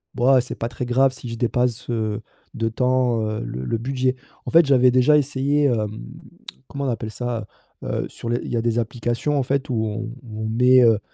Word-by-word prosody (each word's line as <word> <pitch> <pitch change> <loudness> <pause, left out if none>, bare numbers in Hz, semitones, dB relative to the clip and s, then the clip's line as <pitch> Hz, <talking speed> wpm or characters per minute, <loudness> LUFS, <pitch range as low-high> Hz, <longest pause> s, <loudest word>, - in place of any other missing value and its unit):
«B - - -8
ouah 130 0 +5
c'est 125 - -6
pas 115 - -3
très 125 0 -5
grave 130 +2 +3
si 130 - -10
je 115 - -5
dépasse, 120 +1 -1
heu, 110 -3 -2 0.3
de 115 0 -1
tant, 125 0 +1
heu, 110 0 -3
le 60 +2 -5
le 115 - -1
budget». 130 +1 0 0.3
En - - -4
fait, 165 +1 +7
j'avais 130 -2 +5
déjà 130 +4 +5
essayé, 145 +1 +1
hem, 110 -6 +1 0.8
comment 140 0 -4
on - - 0
appelle 110 -2 -3
ça? 120 -3 -4 0.4
Heu, - - -2
sur 115 - -7
les 120 - 0
il - - -6
y 120 - 0
a 115 - +1
des 115 0 0
applications 120 +5 -1
en 135 - +1
fait 140 +2 -1
où 125 - -1
on 110 +1 -3 0.2
où 110 -2 -7
on 110 - -2
met, 125 +3 +5
heu 115 -3 +5
125 Hz, 225 wpm, -22 LUFS, 115-130 Hz, 0.8 s, fait